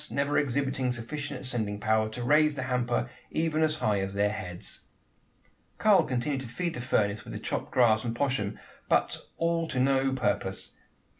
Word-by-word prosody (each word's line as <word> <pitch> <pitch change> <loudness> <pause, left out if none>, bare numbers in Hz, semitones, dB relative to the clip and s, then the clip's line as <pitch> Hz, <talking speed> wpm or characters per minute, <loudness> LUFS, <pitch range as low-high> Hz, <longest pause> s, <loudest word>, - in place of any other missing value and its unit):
never 140 +1 0
exhibiting 135 -2 +1
sufficient 140 +4 -5
ascending 110 -5 -2
power, 110 0 +2
to 120 +3 -5
raise 150 +3 +4
the 130 - -3
hamper 125 -2 0 0.2
even 160 -1 0
as 155 -1 +3
high 105 -9 +1
as 95 0 -3
their 105 0 +2
heads! 90 -4 -5 1.0
Karl 210 -3 +5
continued 130 +2 -1
to 130 - -7
feed 170 +8 -3
the 120 - -5
furnace 105 -4 +1
with - - -9
the - - -4
chopped - - -3
grass 110 -4 +4
and 115 -1 -2
poshm, 120 -6 -1 0.3
but - - +3 0.2
all 165 0 +1
to 130 - -2
no 135 +1 +3
purpose. 130 - -1
125 Hz, 170 wpm, -29 LUFS, 110-145 Hz, 1.0 s, Karl